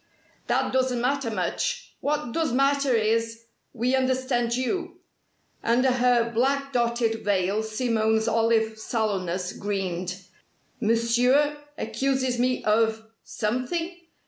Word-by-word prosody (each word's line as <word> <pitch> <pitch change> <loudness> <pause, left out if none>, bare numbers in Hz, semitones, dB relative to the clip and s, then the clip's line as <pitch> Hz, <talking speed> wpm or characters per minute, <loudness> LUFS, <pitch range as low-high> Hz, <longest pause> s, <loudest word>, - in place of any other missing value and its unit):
"That - - 0
doesn't 260 -2 +1
matter 265 0 0
much. 220 - -2
What 295 -4 -1
does 325 +2 0
matter 275 0 +2
is, 230 +1 0 0.3
we 245 +2 -1
understand 255 -2 0
you." 345 +8 -2 0.7
Under 250 +3 +3
her 245 -2 +2
black 275 +4 0
dotted 235 -2 0
veil 200 +1 +1
Simone's 220 -1 0
olive 225 -1 +1
sallowness 190 -6 -2
greened. 185 -2 -3 0.6
"Monsieur 240 +6 +3 0.2
accuses 260 +2 -1
me 255 +1 +1
of 220 +1 +2 0.2
something?" 255 +11 -2
235 Hz, 105 wpm, -25 LUFS, 220-260 Hz, 0.7 s, Under